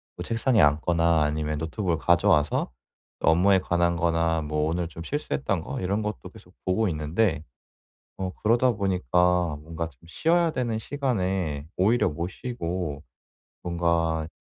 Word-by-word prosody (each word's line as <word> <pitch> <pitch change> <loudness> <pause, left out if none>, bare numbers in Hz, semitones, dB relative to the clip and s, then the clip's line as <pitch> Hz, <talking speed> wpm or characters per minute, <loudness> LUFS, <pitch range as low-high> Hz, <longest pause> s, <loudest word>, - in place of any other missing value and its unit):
뭐 - - -6
책상에 115 -1 +2
앉거나 80 +1 +3
아니면 75 0 -1
노트북을 85 +2 -2
가져와서 75 -5 +2 0.5
업무에 95 +4 +4
관한 85 -1 +1
거나 80 -1 +1
뭐 75 0 -1
오늘 85 +1 -1
좀 85 0 -9
실수했던 135 - -2
거 - - -5
이런 100 +4 0
것도 105 -3 -5
계속 95 -4 -17
보고 95 +4 +1
있는데 80 +2 0 0.7
어 95 -1 -3
그러다 120 +3 +4
보니까 90 - +1
뭔가 80 +1 -5
좀 65 -6 -26
쉬어야 170 - +2
되는 120 -5 -2
시간에 95 - -2
오히려 105 +1 +3
못 85 +4 -4
쉬고 90 - -4 0.6
뭔가 85 -2 0
85 Hz, 295 characters per minute, -26 LUFS, 80-100 Hz, 0.7 s, 업무에